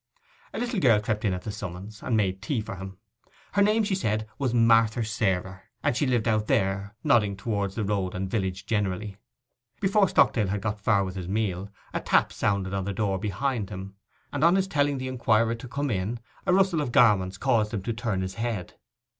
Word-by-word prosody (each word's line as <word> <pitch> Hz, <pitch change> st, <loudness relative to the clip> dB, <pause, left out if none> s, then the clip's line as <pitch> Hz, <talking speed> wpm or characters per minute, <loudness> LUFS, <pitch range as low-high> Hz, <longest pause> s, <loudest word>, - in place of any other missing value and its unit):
A -, -, -6 dB
little 240 Hz, -3 st, -1 dB
girl 120 Hz, -10 st, +5 dB
crept 105 Hz, 0 st, -2 dB
in 100 Hz, -, +2 dB
at 90 Hz, -, -7 dB
the 105 Hz, -, -4 dB
summons, 100 Hz, +1 st, -7 dB
and 115 Hz, -, 0 dB
made 95 Hz, -2 st, 0 dB
tea 115 Hz, +4 st, -1 dB
for 105 Hz, -3 st, -6 dB
him. 95 Hz, 0 st, -8 dB, 0.5 s
Her 200 Hz, -, +2 dB
name, 215 Hz, +2 st, +4 dB
she 205 Hz, -1 st, -1 dB
said, 110 Hz, -, -1 dB
was 135 Hz, -4 st, 0 dB
Marther 115 Hz, -1 st, +4 dB
Sarer, 95 Hz, -3 st, -1 dB, 0.2 s
and -, -, +2 dB
she 140 Hz, +3 st, +1 dB
lived 120 Hz, -3 st, +1 dB
out 110 Hz, -1 st, +1 dB
there, 95 Hz, +1 st, 0 dB
nodding 105 Hz, -4 st, +3 dB
towards 100 Hz, -2 st, -2 dB
the 110 Hz, -, -1 dB
road 95 Hz, -2 st, -1 dB
and 95 Hz, +1 st, -2 dB
village 95 Hz, -2 st, -2 dB
generally. 100 Hz, -1 st, -2 dB, 0.6 s
Before 195 Hz, -1 st, +3 dB
Stockdale 105 Hz, -5 st, +3 dB
had 100 Hz, +1 st, -2 dB
got 105 Hz, +1 st, -2 dB
far 100 Hz, -2 st, +3 dB
with 95 Hz, -1 st, -4 dB
his 90 Hz, -2 st, -5 dB
meal, 100 Hz, -1 st, -1 dB, 0.2 s
a -, -, 0 dB
tap -, -, +2 dB
sounded 100 Hz, -2 st, 0 dB
on 95 Hz, -1 st, -1 dB
the 100 Hz, -, -2 dB
door 95 Hz, -2 st, 0 dB
behind 105 Hz, +2 st, -2 dB
him, 95 Hz, -1 st, -7 dB, 0.4 s
and 145 Hz, 0 st, -1 dB
on 170 Hz, +2 st, +6 dB
his 190 Hz, 0 st, +1 dB
telling 145 Hz, -4 st, +1 dB
the 130 Hz, 0 st, -4 dB
inquirer 115 Hz, -3 st, +2 dB
to 115 Hz, +2 st, -7 dB
come 140 Hz, +2 st, -2 dB
in, 105 Hz, +4 st, -2 dB, 0.3 s
a -, -, +4 dB
rustle 190 Hz, -3 st, +3 dB
of 125 Hz, -, -2 dB
garments 100 Hz, -7 st, +4 dB
caused 110 Hz, -3 st, +1 dB
him 100 Hz, -4 st, -3 dB
to 115 Hz, -, -2 dB
turn 110 Hz, -5 st, -2 dB
his 95 Hz, 0 st, -4 dB
head. 115 Hz, -5 st, -4 dB
105 Hz, 210 wpm, -26 LUFS, 95-120 Hz, 0.6 s, on